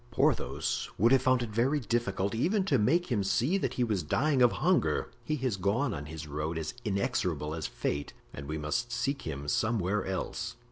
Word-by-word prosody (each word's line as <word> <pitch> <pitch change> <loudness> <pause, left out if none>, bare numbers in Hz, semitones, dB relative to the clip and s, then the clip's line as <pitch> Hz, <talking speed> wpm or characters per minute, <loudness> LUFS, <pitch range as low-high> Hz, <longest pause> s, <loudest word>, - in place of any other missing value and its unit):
Porthos - - 0
would 115 +5 +4
have 135 -1 +6
found 130 -1 +3
it 115 - -5
very 125 +7 +2
difficult 110 -5 -1
even 185 - +1
to 140 -9 +3
make 170 +10 +2
him 105 -4 +2
see 125 - +2
that - - -2
he 125 - +1
was 105 -6 0
dying 135 - +1
of 120 -1 +6
hunger; 180 +5 +1
he 155 - -1
has 130 -7 -1
gone 105 +7 +1
on 75 -3 -5
his 80 0 -7
road 75 +2 -3
as 80 -1 -3
inexorable 90 -7 -1
as 80 -1 -3
fate 70 0 -3 0.2
and 70 0 -7
we 75 +1 -3
must 75 +10 -2
seek 140 +2 -1
him 70 -2 -5
somewhere 105 +1 +1
else." 115 +5 -3
110 Hz, 195 wpm, -30 LUFS, 80-130 Hz, 0.2 s, have